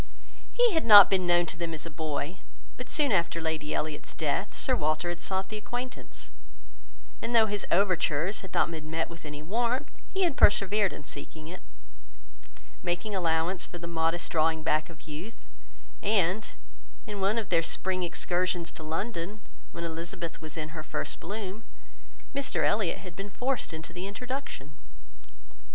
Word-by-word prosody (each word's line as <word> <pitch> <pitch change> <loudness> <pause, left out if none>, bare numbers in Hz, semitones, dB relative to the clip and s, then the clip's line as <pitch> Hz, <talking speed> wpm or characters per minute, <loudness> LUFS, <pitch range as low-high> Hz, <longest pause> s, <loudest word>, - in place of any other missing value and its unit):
He 485 -3 +4
had 320 - +2
not 205 -4 +11
been 185 -2 +3
known 175 0 +5
to 170 - -4
them 165 -1 -2
as 155 - -7
a 165 - -6
boy; 155 +2 -3 0.4
but 250 - -8
soon 290 -4 +3
after 170 -3 +2
Lady 160 -2 -2
Elliot's 155 -1 -3
death, - - -1
Sir - - +2
Walter 155 +3 0
had 175 0 -4
sought 190 0 -1
the 215 - -4
acquaintance, 245 +4 -6 0.9
and 240 - -1
though 225 -1 +7
his 205 -1 -2
overtures 180 -1 +2
had 190 - -10
not - - +2
been 155 -1 -6
met 165 +1 -1
with 165 -1 -10
any 150 0 -6
warmth, 235 - 0 0.2
he 385 0 +1
had 340 -6 +2
persevered 205 -1 +5
in - - -8
seeking 155 +3 -7
it, 185 - -8 1.2
making 180 +4 -2
allowance 170 0 +1
for 175 - -8
the 170 - -7
modest 170 0 0
drawing 160 0 +2
back 155 0 +1
of 160 -2 -14
youth; 165 +10 -8 0.6
and, 200 0 +2 0.6
in 205 -2 -5
one 200 +4 +2
of 220 -4 -1
their 170 -2 +4
spring 185 +2 +1
excursions 175 0 0
to - - -10
London, 170 +5 -3 0.3
when 170 - -6
Elizabeth 170 0 -4
was 155 0 -7
in 155 -1 -3
her 155 0 -6
first 155 - -4
bloom, 205 +2 -5 0.7
Mr 280 -1 0
Elliot 205 -4 +2
had 180 -3 -10
been 195 +2 -6
forced 255 +2 -1
into 160 0 -7
the 180 +2 -4
introduction. 245 - -5
175 Hz, 170 wpm, -29 LUFS, 160-205 Hz, 1.2 s, not